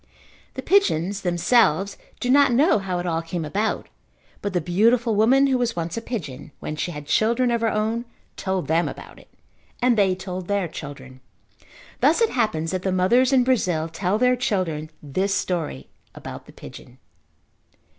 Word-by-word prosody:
The - - -5
pigeons, 200 - +2
themselves, 190 +1 +2 0.2
do 250 - 0
not 280 -1 +5
know 270 - +4
how 190 -2 -3
it 175 - -3
all 165 -2 -1
came 165 0 -4
about, 205 +8 -2 0.5
but 200 - -2
the 180 - +2
beautiful 225 +7 +2
woman 245 +7 +4
who 265 -2 +1
was 235 -2 -1
once 170 0 -3
a 230 - -3
pigeon, 175 - -6
when 155 - -5
she 165 - -3
had 150 -3 -7
children 235 - +2
of 235 -1 0
her 225 - +2
own, 220 +3 -1 0.3
told 190 -2 -2
them 165 +2 +1
about - - -11
it, - - -20 0.5
and 245 -1 +3
they 195 -3 +3
told 185 -1 -6
their 200 -3 0
children. 135 -4 -10 0.8
Thus - - +4
it 460 -1 +2
happens 170 -10 0
that 185 -1 -2
the 190 - -1
mothers 235 +8 +3
in 260 -2 +4
Brazil 185 -11 +1
tell 180 +4 -1
their 250 +2 +3
children 180 -10 -2
this 190 +8 -1
story 165 - -3 0.3
about - - -9
the - - -13
pigeon. 125 - -12
195 Hz, 175 wpm, -23 LUFS, 170-235 Hz, 0.8 s, not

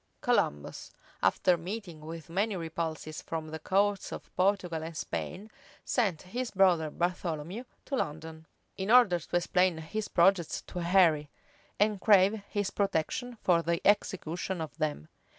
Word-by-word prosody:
Columbus, 75 0 0 0.3
after 180 -1 +3
meeting 180 -1 -6
with 160 +1 -8
many 200 +5 0
repulses 160 -2 -4
from 160 -1 -5
the 160 +1 -6
courts 200 +4 +1
of - - -9
Portugal 180 -4 +1
and 160 0 -6
Spain 200 +7 -5 0.3
sent 200 - 0
his 240 +6 -4
brother 180 -5 +3
Bartholomew 175 +5 -3 0.2
to 280 - -2
London, 160 - -4 0.3
in 190 +1 -3
order 235 -7 +6
to 170 - -6
explain 180 0 +2
his 205 +7 -4
projects 175 -1 +2
to 180 - -7
Henry, 170 -4 +3 0.5
and 205 -1 +2
crave 205 0 +5
his 205 -2 -1
protection 200 +6 -1
for 170 -2 +4
the 170 0 0
execution 190 -3 0
of 160 -2 -5
them. 145 - -2
175 Hz, 140 wpm, -30 LUFS, 160-200 Hz, 0.5 s, order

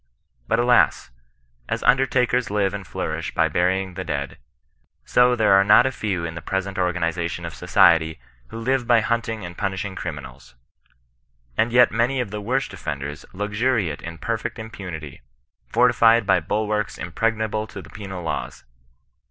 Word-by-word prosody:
But 115 - +2
alas, 120 - +3 0.6
as - - -2
und 125 +2 +5
ertakers 125 -2 +1
live 100 -2 0
and 100 -3 -6
flourish - - -4
by - - +3
burying 95 +1 0
the 95 +1 -5
dead, 70 -4 -4 0.7
so 125 0 +4
there 110 -4 +3
are 95 0 +6
not 105 +5 +6
a 130 - +1
few 95 -8 -3
in 80 - -5
the 85 - -7
present 95 0 -3
organizi^ 85 -2 0
tion - - -6
of - - -6
society 80 -1 +3 0.3
who - - -9
live 125 +1 0
by 120 -2 +5
hunting 115 -3 -2
and 85 0 -8
punishing 95 0 -3
cri 90 - -4
minals. 65 -4 -12 1.0
And 115 +2 +1
yet 125 0 +5
many 120 +4 +1
of 120 -5 -3
the 105 0 -4
worst 130 +6 -1
offenders 70 +1 -6
luxuriate 105 - -1
in 85 -1 -7
perfect 115 +4 -3
impunity, 90 -10 -8 0.5
fortified 115 - +4
by - - +4
bulwarks 105 0 -2
impregnable 110 +4 -1
to 105 - -9
the - - -12
penal 95 -3 -7
laws. 80 - -4
105 Hz, 160 wpm, -23 LUFS, 90-115 Hz, 1.0 s, are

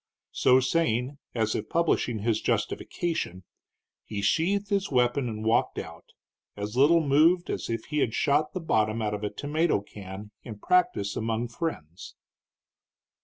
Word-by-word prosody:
So 130 0 +4
saying, 130 -1 0 0.2
as 110 -2 +1
if - - -4
publishing 125 -10 0
his 115 -1 +1
justification, 160 - -2 0.6
he 100 -2 -5
sheathed 195 - +1
his 200 -1 +1
weapon 125 0 +1
and 110 -1 -5
walked 115 +2 +2
out, - - -7 0.5
as 105 +2 -5
little 155 +6 +5
moved 165 +6 +4
as - - -4
if 115 -1 -3
he 150 - -2
had 115 -5 0
shot 150 +1 +1
the 185 - -3
bottom 110 -7 +1
out 105 -1 -1
of 105 0 -4
a 105 - -1
tomato 155 +2 0
can 100 0 -10
in 110 -4 -9
practice 105 - +1
among 115 +1 -2
friends. 105 - -6
120 Hz, 150 wpm, -27 LUFS, 110-160 Hz, 0.6 s, little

